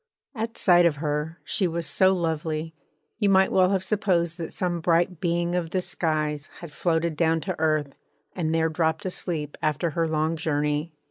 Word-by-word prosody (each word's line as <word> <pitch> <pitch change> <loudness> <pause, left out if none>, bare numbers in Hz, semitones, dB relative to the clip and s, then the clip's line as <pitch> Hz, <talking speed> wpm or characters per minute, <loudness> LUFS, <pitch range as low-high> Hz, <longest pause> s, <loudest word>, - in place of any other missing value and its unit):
At 225 -1 -4
sight 175 -2 +5
of 160 - 0
her, 150 +2 -3
she 190 - 0
was 170 0 -2
so 185 +6 +4
lovely, 160 -3 -1 0.5
you 205 -3 +3
might 190 0 +4
well 185 -1 +4
have 190 -1 +1
supposed 180 -5 0
that 165 - -5
some 175 -2 -1
bright 170 +1 +2
being 170 0 0
of 175 -2 -1
the 185 - 0
skies 155 -4 -2
had 170 -3 -9
floated 160 +1 0
down 165 +1 +2
to 145 - -4
earth 155 -3 +1 0.4
and 160 -3 -1
there 160 0 +2
dropped 160 +1 0
asleep 165 -5 -3
after 155 +2 0
her 165 +2 0
long 160 +1 0
journey. 150 +1 -1
165 Hz, 180 wpm, -25 LUFS, 155-175 Hz, 0.5 s, sight